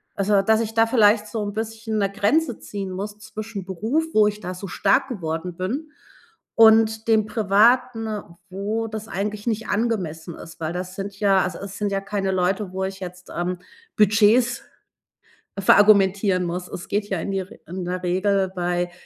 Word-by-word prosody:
also, 200 0 +2
dass 220 +3 +3
ich 225 -1 -3
da 225 0 +4
vielleicht 215 -2 +4
so 220 -1 -3
'n 205 0 -4
bisschen 220 0 -3
'ne 195 -1 0
Grenze 230 +7 +1
ziehen 200 -2 -6
muss 205 +3 -6
zwischen 215 -2 -7
Beruf, 220 - -1
wo 215 -1 +5
ich 210 0 -3
da 185 -3 -5
so 190 +2 -7
stark 205 +9 +2
geworden 170 -4 -4
bin 265 +12 -3 0.6
und 220 0 +5
dem 220 -2 +3
Privaten, 225 +3 +3 0.4
wo 210 +4 -3
das 220 0 -6
eigentlich 205 +2 -4
nicht 225 -1 -1
angemessen 180 -8 -2
ist. 165 - -12
Weil 160 +1 -3
das 180 +1 -5
sind 200 0 -6
ja 195 -2 +4
also, 185 - -4
es 200 0 -8
sind 205 -1 -1
ja 195 0 -1
keine 195 -1 -2
Leute, 185 +2 0
wo 190 - -2
ich 190 0 -6
jetzt, 180 -1 -9
ähm, 180 +1 -2 0.4
Budgets 220 +4 +4 1.0
verargumentieren 195 -2 +4
muss. 180 +1 -4
Es 180 - -7
geht 205 0 -1
ja 190 - -1
in 180 - -4
die 195 - -1
R 190 0 -6 0.2
in 180 +2 -5
der 180 +1 -3
Regel 190 +1 +1
bei 175 0 -1
200 Hz, 180 wpm, -23 LUFS, 185-220 Hz, 1.0 s, wo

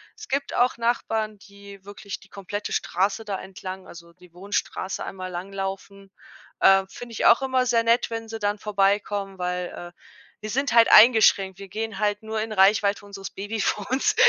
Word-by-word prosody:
Es 435 -1 -12
gibt 275 +1 -2
auch 245 0 +2
Nachbarn, 225 -2 -1
die 200 -1 -14
wirklich 200 0 -8
die 195 - -19
komplette 200 +2 -6
Straße 200 +4 -1
da 200 -2 -3
entlang 190 0 -8
also 170 0 -13
die 175 0 -20
Wohnstraße 190 0 -3
einmal 185 -1 -6
langlaufen. 195 +2 -6 0.5
Ähm, 195 0 +5
finde 240 +4 -10
ich 230 - -2
auch 235 - +6
immer 260 -1 +1
sehr 230 -2 +2
nett, 235 +1 +2
wenn 225 -1 -5
sie 225 0 -6
dann 205 0 -1
vorbeikommen, 200 -1 0
weil, 180 0 -2 0.3
äh, - - -38 0.4
wir 215 - -7
sind 275 +5 -1
halt 230 -1 +6
eingeschränkt. 215 -4 +6
Wir 195 - -9
gehen 220 +1 -5
halt 210 0 0
nur 220 0 -3
in 220 0 -4
Reichweite 200 +1 +3
unseres 195 -1 -8
Babyfons. 210 - -1
205 Hz, 170 wpm, -24 LUFS, 195-225 Hz, 0.5 s, auch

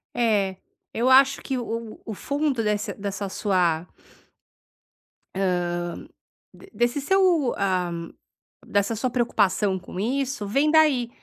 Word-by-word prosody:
É, 210 -5 +1 0.4
eu 240 +3 +1
acho 270 +1 +5
que 265 - -3
o 230 -2 -4
o - - -22
o 220 - -5
fundo 280 +1 -1
dessa, 210 0 -1
dessa 200 0 -4
sua 180 -5 0 1.5
hã, 190 -1 +1 1.0
de 385 - -16
desse 240 +4 0
seu, 350 -5 +3
ah, 185 -3 0 0.7
dessa 200 +2 0
sua 250 +4 -1
preocupação 205 -5 +1
com, 180 0 -9
isso 255 0 -2
vem 275 +9 +2
daí, 300 -7 +4
225 Hz, 125 wpm, -24 LUFS, 200-270 Hz, 1.5 s, acho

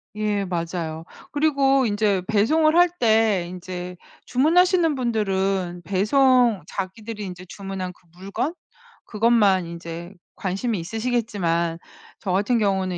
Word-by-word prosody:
예. 210 -2 -1
맞아요. 165 -2 -4 0.3
그리고 275 -3 +3
인제 205 -3 +1
배송을 310 +10 +3
할 355 +1 +7
때 220 -5 +3
인제 180 0 -7 0.3
주문하시는 330 +4 +3
분들은 195 -7 -1
배송 235 - +3
자기들이 210 +3 -6
인제 185 -1 -8
주문한 195 -1 -6
그 175 - -29
물건 200 - -3 0.5
그것만 210 -5 +3
인제 170 +1 -8 0.2
관심이 200 +1 -2
있으시겠지만 200 -5 -1 0.4
저 190 - -3
같은 205 +6 +2
경우는 190 -3 0
200 Hz, 270 characters per minute, -23 LUFS, 180-240 Hz, 0.5 s, 할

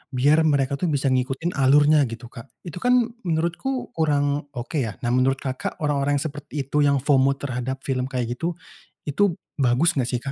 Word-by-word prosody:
biar 145 +5 +4
mereka 140 -2 +1
tuh 180 - 0
bisa 140 -3 +1
ngikutin 130 +6 -1
alurnya 145 +2 +5
gitu, 115 +1 -9
Kak. 115 0 -11 0.2
Itu 175 -1 -7
kan 245 0 +2 0.2
menurutku 170 +11 -2
kurang 145 -2 0
oke 125 +6 -3
ya. 110 -6 -2
Nah 120 - 0
menurut 130 +2 +3
Kakak, 130 -1 -4
orang-orang 145 -1 +1
yang 140 - -1
seperti 145 -1 -5
itu 140 +3 -1
yang 140 -2 +3
FOMO 140 -1 +3
terhadap 130 -1 -4
film 130 -2 -1
kayak 125 -3 -3
gitu, 170 +1 -2 0.5
itu 175 +5 +1 0.2
bagus 130 +5 +3
enggak 125 - 0
sih, 125 -2 -2
Kak? 135 - -4
140 Hz, 185 wpm, -23 LUFS, 130-155 Hz, 0.5 s, alurnya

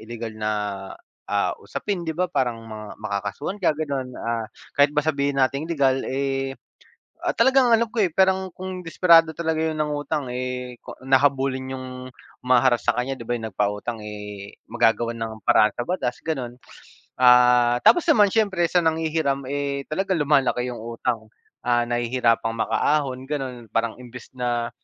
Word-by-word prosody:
ilegal 115 0 -7
na, 110 0 -2 0.8
ah, - - +1
usapin 195 -4 -4
di 160 - -2
ba, 180 +1 +1
parang 125 -8 -1
mga 110 -1 -9
makakasuhan 105 - -4
ka - - +4
gano'n, 140 -4 -3
ah, 115 -1 -2 0.3
kahit 145 0 +5
ba - - +1
sabihin 140 -2 0
nating 140 +2 +1
legal, 135 -4 +2
eh, 135 0 -2 0.7
at - - 0
talagang 265 -2 +4
alam 230 +1 +2
ko, 240 - -6
eh, 185 - +2
parang 190 0 +3
kung 185 0 -6
desperado 165 -1 +5
talaga 160 -1 -1
'yun 160 - -1
nangutang, 150 -2 -2
eh, 125 0 -4
ko - - -9
an 135 - -10
na 130 - +8
habulin 135 -1 0
'yung 130 0 -6 0.6
huma-harass 125 -1 +3
sa 120 - +5
kaniya 130 +2 -2
di 115 - -8
ba, 120 - -1
'yung 110 -1 -5
nagpautang, 105 +4 -2
eh, 105 -1 -8 0.2
magagawa 120 0 +2
ng 110 -2 -6
paraan 105 -1 +5
sa 120 - -2
batas 130 -9 -2
gano'n, 130 -7 -3 0.7
ah, 125 -1 +6
tapos 350 - +6
naman 210 -10 +6
siyempre 200 -6 +1
sa 180 - +3
nanghihiram, 160 -3 0
eh, 140 -1 -2
talaga 190 +4 -1
lumalaki 135 -4 +2
'yung 120 - -7
utang, 115 -1 -3 0.4
ah, 120 -1 +3
nahihirapang 120 -1 +1
makaahon 130 +1 0
gano'n 130 -5 -4
parang 115 0 0
imbes 125 -1 -11
na 120 -1 -1
130 Hz, 160 wpm, -23 LUFS, 120-155 Hz, 0.8 s, na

